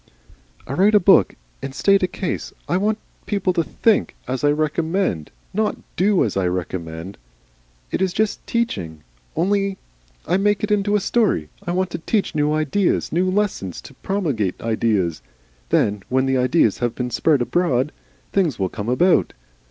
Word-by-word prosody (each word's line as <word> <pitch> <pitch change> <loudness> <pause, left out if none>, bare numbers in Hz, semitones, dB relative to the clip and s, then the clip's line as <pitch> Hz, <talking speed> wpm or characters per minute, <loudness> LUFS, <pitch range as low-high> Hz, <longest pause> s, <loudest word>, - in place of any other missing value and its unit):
"I 130 - -5
write 200 +7 +4
a - - +8
book 195 0 +5 0.3
and 135 0 -6
state 195 +6 +4
a 185 - +2
case. 185 0 -4
I - - 0
want 210 +3 +1 0.3
people 195 -3 0
to 170 -2 +1
THINK 220 +5 +1
as 130 +1 -3
I 145 - +5
recommend, 155 - 0 0.2
not 215 +2 0
to - - -21
DO 195 0 +3
as 105 - -3
I 95 -2 +1
recommend. 90 0 -4 0.7
It - - -1
is 190 -1 +2
just 215 +3 -1
Teaching. 90 - -2 0.3
Only 195 +2 +1 0.5
I 175 - +2
make 205 +1 +1
it 210 - -1
into 205 0 +2
a - - +4
story. 195 - +1 0.2
I - - 0
want 185 0 0
to 165 - -4
Teach 205 +5 0
new 150 -1 +1
Ideas, 155 +5 +1
new 180 +3 +1
Lessons, 185 - -1
to - - -13
promulgate 140 - -2
Ideas. 110 -7 0 0.5
Then 105 -1 +2
when 130 +1 +2
the 135 0 +1
Ideas 125 - +2
have 120 -1 -1
been 125 -1 -3
spread 150 +4 +2
abroad 135 0 +1 0.4
Things 175 - +1
will 95 -2 -1
come 105 +4 -5
about. 175 +9 +3
160 Hz, 170 wpm, -21 LUFS, -, 0.7 s, a